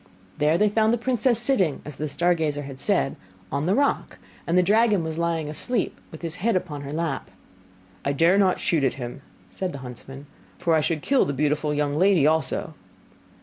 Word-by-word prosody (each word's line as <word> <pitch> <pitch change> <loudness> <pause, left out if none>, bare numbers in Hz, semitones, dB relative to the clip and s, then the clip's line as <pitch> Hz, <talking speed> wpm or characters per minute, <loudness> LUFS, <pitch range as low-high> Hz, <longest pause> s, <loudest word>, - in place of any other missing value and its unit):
There 150 +2 +3
they 210 - +3
found 220 +1 +2
the 240 - +2
princess 240 0 +2
sitting, 225 - +2
as 150 -2 -8
the 155 - -2
star 170 +5 +2
gazer 150 -3 -2
had 135 -1 -8
said, 195 -4 +1 0.4
on 140 +3 -1
the 190 - +3
rock; 280 +2 0 0.3
and 170 +2 +2
the 180 - +5
dragon 210 -1 +3
was 160 0 -4
lying 165 -2 -1
asleep, 205 +9 -2
with 160 - -11
his 165 +1 -3
head 225 +3 +1
upon 165 -6 -3
her 140 0 -7
lap. 160 -2 -3 0.7
'I 140 - 0
dare 165 +6 +4
not 190 -2 +3
shoot 160 -5 +1
at 135 - +2
him,' 125 0 -7 0.3
said 185 -2 -4
the - - -6
huntsman, 135 +3 -10 0.3
'for 165 - +1
I 160 - +4
should 155 -1 -1
kill 275 -1 +3
the 140 - -2
beautiful 150 +2 0
young 145 -1 0
lady 185 -4 +4
also. 155 -1 0
165 Hz, 200 wpm, -24 LUFS, 145-195 Hz, 0.7 s, the